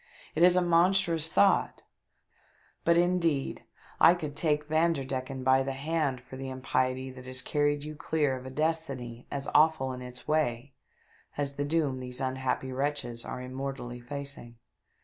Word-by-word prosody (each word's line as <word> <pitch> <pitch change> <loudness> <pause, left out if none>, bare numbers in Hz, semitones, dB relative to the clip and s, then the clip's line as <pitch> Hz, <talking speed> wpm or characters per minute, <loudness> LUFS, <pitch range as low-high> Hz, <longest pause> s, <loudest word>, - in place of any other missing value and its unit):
It 155 - -1
is 180 +1 +7
a 180 - +4
monstrous 170 -2 +3
thought 200 -1 +3 0.5
— - - -35
but, 170 0 +5
indeed, 170 -5 +1 0.3
I 175 - +7
could 150 -4 -5
take 150 -2 +1
Vanderdecken 135 -5 0
by 130 +1 +5
the 135 0 -2
hand 140 -2 -1
for 130 +1 -11
the 135 0 -5
impiety 130 0 -1
that 130 0 -11
has 130 0 -1
carried 145 0 +1
you 155 0 -6
clear 150 -3 0
of 130 0 -8
a - - -5
destiny 135 -5 -3
as 140 0 -4
awful 150 -4 +4
in 125 - -7
its 125 0 -9
way 140 -4 0 0.6
as 140 -1 -1
the 145 +1 -2
doom 145 -4 0
these 125 0 -6
unhappy 130 0 -1
wretches 130 -3 -2
are 125 - -6
immortally 130 -1 -5
facing." 140 -1 -7
140 Hz, 160 wpm, -29 LUFS, 130-155 Hz, 0.6 s, is